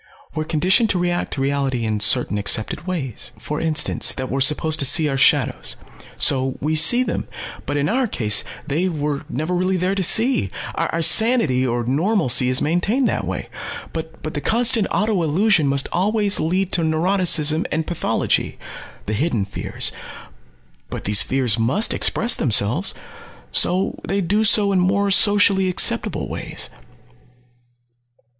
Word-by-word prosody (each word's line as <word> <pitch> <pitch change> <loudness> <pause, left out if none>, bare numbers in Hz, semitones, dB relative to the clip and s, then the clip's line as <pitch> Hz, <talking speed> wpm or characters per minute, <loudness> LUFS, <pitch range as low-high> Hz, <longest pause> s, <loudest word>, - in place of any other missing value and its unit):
"We're 155 - -3
conditioned 185 +8 +2
to 190 - 0
react 175 0 -2
to 135 - -4
reality 135 -3 -1
in 110 -1 -2
certain 105 0 +3
accepted 110 - -1
ways. 140 - -5
For 120 +8 -5
instance 160 -2 0
that 130 -1 -5
we're 135 +1 -1
supposed 155 +3 +1
to - - +3
see 155 +4 +3
our 140 - -2
shadows. 135 - +1 0.4
So 130 -2 +1
we 155 +2 -1
see 200 +11 +5
them. - - -4 0.4
But 145 - -2
in 145 0 0
our 255 +3 0
case 105 - +1 0.2
they 165 +5 -1
were 150 -3 -3
never 155 +7 -3
really 185 +1 0
there 185 +2 -1
to 195 - -2
see. 225 - +3 0.2
Our 165 0 -2
sanity 165 - +3
or 120 0 -1
'normalcy' 140 - +2
is 130 +1 +1
maintained 205 - 0
that - - -3
way. - - -5 0.5
But 160 0 -7
the 145 - -4
constant 230 - +2
auto 210 -2 0
illusion 170 +1 +2
must 135 0 +1
always 205 +2 0
lead 185 +4 -1
to 175 - +2
neuroticism 160 -1 +1
and 160 +1 -1
pathology 175 - -1 0.5
the 105 - -3
hidden 115 -4 -1
fears. 100 - -3 1.0
But - - -6
these 105 0 +3
fears 125 -4 +1
must 130 - +1
express 235 +2 +1
themselves. 120 - 0 0.6
So 185 +2 +1
they 195 +1 -1
do 205 +5 +1
so 205 -1 +4
in 190 - +2
more 200 +2 +1
socially 200 -1 +4
acceptable 180 - 0
ways." - - -5
160 Hz, 150 wpm, -20 LUFS, 135-195 Hz, 1.0 s, see